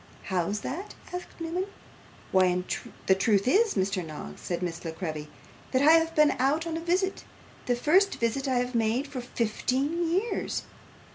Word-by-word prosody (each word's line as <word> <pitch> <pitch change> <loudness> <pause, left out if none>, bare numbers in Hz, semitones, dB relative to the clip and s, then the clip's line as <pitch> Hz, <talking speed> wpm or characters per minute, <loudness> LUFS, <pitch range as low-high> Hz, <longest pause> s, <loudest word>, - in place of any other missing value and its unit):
'How's 190 +3 -1
that?' 395 +5 -5 0.2
asked 360 0 -7
Newman. 340 +3 -2 0.6
'Why, 180 -1 +3 0.4
the 190 - +6
truth 200 +2 +2
is, 430 - +4
Mr. 190 -1 0
Noggs,' 150 - -8
said 175 0 -3
Miss 170 -2 -4
La 165 - -3
Creevy, 155 -2 -5 0.4
'that 260 +1 +2
I 305 - +8
have 330 0 +4
been 300 -1 +6
out 290 +5 +2
on 330 -1 -3
a - - -2
visit 370 +3 0 0.4
the 245 - +3
first 365 +11 +3
visit 235 +4 -1
I 260 - +1
have 250 +1 -1
made 230 +3 +1
for 270 -3 -5
fifteen 260 +8 -1
years. 395 +7 -1
255 Hz, 165 wpm, -28 LUFS, -, 0.6 s, I